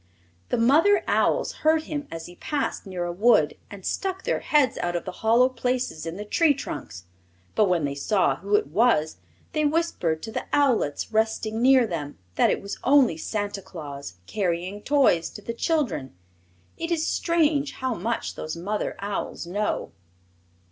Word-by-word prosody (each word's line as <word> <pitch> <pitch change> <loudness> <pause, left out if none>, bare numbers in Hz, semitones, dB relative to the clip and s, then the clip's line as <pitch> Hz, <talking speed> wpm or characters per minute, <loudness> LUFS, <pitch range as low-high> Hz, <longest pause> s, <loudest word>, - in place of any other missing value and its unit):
The - - +1
mother 310 - +4
owls - - +2
heard 315 0 +3
him 290 -2 -5
as 165 0 -7
he 175 - -11
passed 290 -7 -3
near 180 -2 -3
a 175 - -2
wood 175 -5 +3
and 200 -2 -10
stuck 380 -1 -2
their - - 0
heads 290 -5 +2
out 175 0 -1
of 175 - -2
the - - -4
hollow 230 +3 +5
places 250 -9 -2
in 165 +2 -5
the 210 - -6
tree 295 +7 +3
trunks; 90 - -7 0.5
but 210 -3 +3
when 170 -4 +2
they 140 - -2
saw 185 +8 +1
who 200 +3 0
it - - +3
was 160 - +2 0.3
they 305 -2 0
whispered 295 - 0
to 225 - -5
the - - -4
owlets 250 - +1
nestling 220 0 0
near 260 -1 +6
them 155 -8 -5 0.2
that - - +3
it - - -1
was 200 - -6
only 265 - +5
Santa 205 +4 -3
Claus 140 - -8
carrying 185 - -2
toys 265 - +3
to 210 - -10
the 230 - -4
children. 235 - -1 0.6
It 330 - -3
is 325 -2 0
strange 305 -4 +1
how 260 -1 -2
much 225 +3 -2
those 155 +2 -5
mother 205 +5 -2
owls 200 -3 -4
know. 205 +5 -2
215 Hz, 170 wpm, -25 LUFS, 175-280 Hz, 0.6 s, near